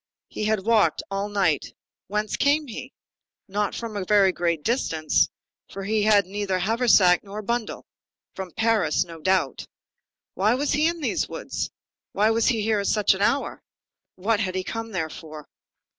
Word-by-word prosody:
He 215 - -4
had 215 -3 0
walked 225 -2 +3
all 200 +1 -2
night. 190 -8 0 0.3
Whence 210 +2 -2
came 295 +2 +2
he? 255 +1 -8 0.6
Not 205 0 -1
from 230 -2 -5
a 200 - -2
very 195 0 +4
great 170 -3 -1
distance; 165 - +1 0.4
for 195 - -7
he 215 +2 0
had 205 -1 +4
neither 195 0 -2
haversack, 200 -3 +4
nor 205 +1 -7
bundle. 235 +1 -3 0.5
From 190 -1 -6
Paris, 215 -4 +1
no 165 -2 -11
doubt. 190 +2 0 0.7
Why 210 +5 +2
was 285 +3 -1
he 300 +2 +3
in 335 -1 -2
these - - -1
woods? - - -4 0.4
why 215 +2 +3
was 225 0 +2
he 225 -5 +1
there 220 -2 +2
at 200 - -2
such 210 -2 +3
an 190 - -5
hour? 275 +7 0 0.5
what 205 +3 0
had 185 -4 -2
he 185 - -1
come 225 +3 -5
there 170 -5 -2
for? 155 -1 -10
205 Hz, 170 wpm, -24 LUFS, 185-225 Hz, 0.7 s, very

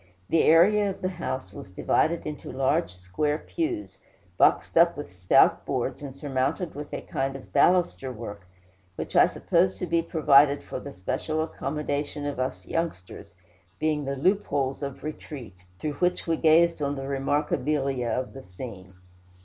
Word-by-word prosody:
The 165 - +4
area 200 +6 +5
of 190 - -7
the 185 - +1
house 130 - -5
was 100 - -9
divided 160 - +1
into 150 -1 -6
large 130 -9 +1
square 95 +12 -2
pews, 330 - -4 0.4
boxed - - +3
up 170 -1 +5
with 145 -9 -7
stout 90 0 +4
boards, - - -2
and 140 -2 -8
surmounted 140 +5 -1
with 145 +1 -7
a - - -4
kind 135 0 -3
of 135 - -11
baluster 175 -7 +3
work, 105 -5 -8 0.5
which - - -6
I - - +7
supposed 180 +2 +1
to - - -3
be 170 -1 +1
provided 145 -3 +4
for - - -6
the 140 - -8
special 155 - -2
accommodation 145 -1 -3
of 145 -3 -3
us 130 0 -3
youngsters, 100 - -4 0.4
being 155 -2 0
the 140 +1 -2
"loopholes 145 -5 0
of 140 -2 -6
retreat" 140 -9 -7 0.2
through 150 +9 -3
which 180 0 +1
we 165 - +1
gazed 165 +1 +4
on 140 0 0
the 135 - -5
"remarkabilia" 135 -1 0
of 130 +2 -2
the 135 - -9
scene. 95 -2 -10
145 Hz, 160 wpm, -26 LUFS, 130-165 Hz, 0.5 s, I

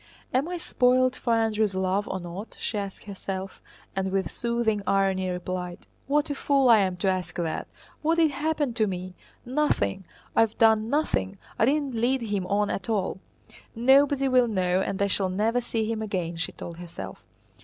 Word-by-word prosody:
"Am 265 +5 +2
I 355 - -3
spoiled 255 -4 +2
for 235 - 0
Andrew's 220 -3 +1
love 190 +2 0
or 190 - -3
not?" 180 +5 -8
she - - -3
asked 200 -2 -4
herself, 195 -1 -6 0.3
and 190 0 -1
with 190 -3 -1
soothing 235 -3 0
irony 190 -1 +2
replied: 180 0 -4 0.2
"What 295 +2 +1
a - - +1
fool 275 -2 +2
I 225 -2 +8
am 185 -2 0
to 185 - -1
ask 185 -2 -1
that! 170 -3 -2 0.3
What 320 +2 +2
did 320 -2 +4
happen 295 -2 -1
to 220 -2 +1
me? 185 -1 -5 0.3
Nothing! 245 - 0 0.3
I - - +6
have 225 -1 +1
done 220 -1 +4
nothing, 165 - 0 0.2
I - - +5
didn't 280 0 +1
lead 240 +2 +1
him 205 -4 -2
on 205 +1 +1
at 195 - -4
all. 195 -4 0 0.6
Nobody 275 +3 +4
will 255 -2 +4
know 185 -3 +1
and 195 - -2
I 200 - +3
shall 195 -1 0
never 220 +6 +1
see 225 -2 -1
him 220 0 -2
again," 180 -5 -2
she 165 -1 -3
told 170 -1 -8
herself. 165 - -8
210 Hz, 185 wpm, -26 LUFS, 185-250 Hz, 0.6 s, I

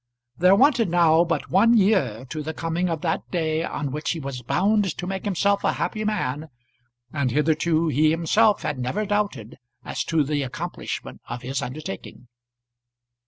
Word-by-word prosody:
There 180 +7 +5
wanted 240 - +4
now 170 -1 +4
but 165 -3 -3
one 230 +6 +5
year 145 - +2
to 155 - -3
the 160 +2 -5
coming 165 +2 -1
of 165 -2 -3
that 165 -2 0
day 160 -2 -1
on 140 -4 -3
which 150 +3 -3
he 170 - -1
was 135 -3 -6
bound 195 - +1
to 180 - -4
make 190 +1 -4
himself 200 +1 +1
a - - +2
happy 215 - -2
man, 160 -8 -2 0.6
and 140 -4 0
hitherto 155 +4 +1
he 155 +2 +3
himself 200 +7 +2
had 145 -3 -2
never 160 +13 -2
doubted 200 - -2 0.3
as - - -3
to 160 -2 +2
the 145 +1 -1
accomplishment 130 -2 -5
of 125 - -6
his 135 +1 -3
undertaking. 150 -2 -7
165 Hz, 165 wpm, -24 LUFS, 145-195 Hz, 0.6 s, There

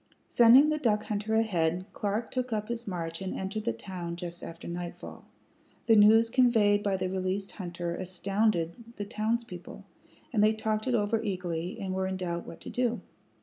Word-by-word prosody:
Sending 245 +5 +7
the 305 0 0
duck 215 -6 +1
hunter 215 +1 -2
ahead, 180 -5 +1
Clark 210 +3 -2
took 255 -1 -2
up 215 0 -2
his 235 -1 -4
march 165 -2 -4
and 190 - -3
entered 195 +3 -4
the - - +2
town 170 +7 -6
just 175 0 -7
after 165 0 -8
nightfall. 175 0 -7 0.6
The 225 -2 +5
news 220 +2 +7
conveyed 225 -4 +4
by 200 -2 0
the 185 - -1
released 190 +1 -2
hunter 175 -2 -4
astounded 195 +3 -1
the 205 - -4
townspeople, 215 -3 -3 0.5
and 210 -3 +3
they 215 +1 +5
talked 220 +1 -2
it 250 - +2
over 220 +1 +1
eagerly, 180 -5 -3
and 190 -1 -3
were 190 0 -1
in 190 0 -3
doubt 170 -2 -4
what - - -10
to - - -7
do. 245 -1 0
205 Hz, 180 wpm, -29 LUFS, 180-225 Hz, 0.6 s, Sending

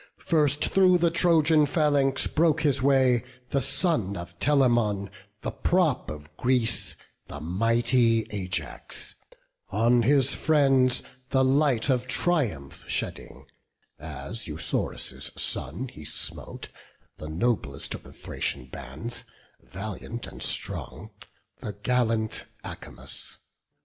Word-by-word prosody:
First 150 -3 +2
through 185 -2 +4
the 170 -1 +2
Trojan 160 -3 +4
phalanx 145 -3 +2
broke 160 0 +2
his 140 -4 +2
way 130 -3 +3 0.3
The 140 - +1
son 120 - +1
of 85 0 -9
Telamon, 120 -8 +2 0.3
the - - -3
prop 170 -8 +1
of 75 0 -9
Greece, 120 -3 +1 0.3
The 70 - -8
mighty 115 - +2
Ajax; 95 -3 -4 0.6
on 115 +4 +3
his 135 +2 +4
friends 135 -5 +3 0.3
the 130 -1 +3
light 135 -3 +2
Of 130 -2 +1
triumph 115 - 0
shedding, - - -4 0.5
as 75 - -6
Eusorus' 80 +1 -2
son 90 - 0
He 75 - -12
smote, - - -2 0.5
the 75 - -8
noblest 80 - -1
of - - -7
the - - -14
Thracian 60 - -3
bands, 70 - -7 0.4
Valiant 110 +4 -7
and - - -11
strong, - - -3 0.5
the 105 - -5
gallant 110 +1 0 0.2
Acamas. 65 +2 -8
120 Hz, 110 wpm, -26 LUFS, 100-140 Hz, 0.6 s, through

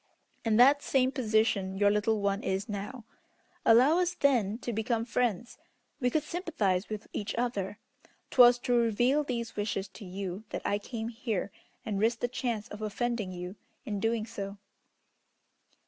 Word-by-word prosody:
In 220 -2 +2
that 275 +4 +7
same 260 -2 +2
position 215 -6 +1
your 205 0 +4
little 210 +1 +1
one 200 +1 0
is 190 +3 -2
now. 210 +3 -6 0.6
Allow 260 +9 +6
us, 360 0 0
then, 230 -7 +2
to 240 -1 -4
become 225 +1 -1
friends. 235 -2 -1 0.4
We 250 -3 +2
could 305 +4 0
sympathize 305 - -1
with 215 0 -5
each 210 0 -3
other. 210 -5 -2 0.5
'Twas 245 -1 +7
to 245 - 0
reveal 240 +5 +3
these 235 -4 -4
wishes 205 -1 -2
to 210 - -12
you 190 +1 -5
that - - -5
I 205 - +1
came 225 +1 -5
here, 225 -4 -3 0.3
and 205 -3 -2
risked 230 +2 +1
the 245 - +1
chance 240 -4 -3
of 210 - -8
offending 215 -1 -2
you 180 +2 -7 0.3
in 210 -5 -3
doing 225 +1 0
so." 200 -3 -6
225 Hz, 160 wpm, -30 LUFS, 205-245 Hz, 0.6 s, that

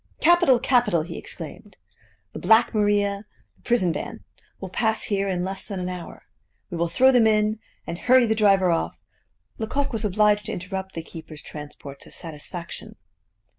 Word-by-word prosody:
"Capital! 345 -7 +5
capital!" 235 - +2
he 170 - -7
exclaimed. - - -9 0.6
"The - - -6
Black 225 +2 +4
Maria, 205 -1 +1 0.3
the - - -29
prison 205 -9 +2
van, 145 - -6 0.4
will 190 - -6
pass 220 +2 +1
here 200 -1 0
in 180 -1 -1
less 190 +1 -4
than 200 -3 -4
an 180 0 -3
hour; 180 -2 -8 0.5
we 175 - -3
will 170 0 0
throw 260 +10 +5
them 240 -3 +5
in, 215 0 +2 0.3
and 170 +1 -5
hurry 255 0 +5
the 220 - +2
driver 195 -4 +4
off 165 - -1 0.3
" - - -42
Lecoq 275 +5 -1
was 225 -1 -1
obliged 210 0 +2
to - - -3
interrupt 190 +1 -5
the 165 - -4
keeper's 160 -2 -10
transports 145 -2 -9
of - - -7
satisfaction. 170 +1 -8
200 Hz, 170 wpm, -24 LUFS, 175-220 Hz, 0.6 s, Capital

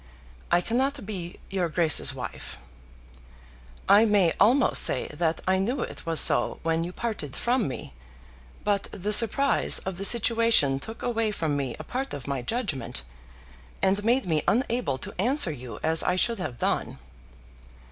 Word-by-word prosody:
I 175 0 +4
cannot 260 +4 -2
be 180 -4 -6
your 185 -3 -1
Grace's 160 0 +3
wife. - - -8 1.3
I 205 +2 +6
may 205 -6 +3
almost 240 +6 +4
say 125 - +1
that 160 +2 -2
I 190 0 +2
knew 240 +8 -1
it - - -7
was 165 -2 +1
so - - +3
when 165 0 0
you 175 - -5
parted 205 - -5
from 245 -1 0
me; 130 - -7 0.7
but 205 -1 -1
the 205 +3 -2
surprise 240 +6 +4
of 190 -2 -5
the 195 - -4
situation 230 - +3
took 225 +10 -9
away 230 -2 0
from 160 -8 -2
me 135 -4 -3
a - - -8
part 265 +1 -5
of 135 -4 -9
my 140 -2 -3
judgment, 135 - -3 0.8
and 200 +2 +1
made 245 +4 +1
me 160 -4 0
unable 235 - 0
to - - -8
answer 255 - +2
you 125 -6 -9
as 160 +1 +2
I 180 - 0
should 230 +4 +1
have 150 -10 -5
done. - - -2
195 Hz, 160 wpm, -26 LUFS, 160-230 Hz, 1.3 s, I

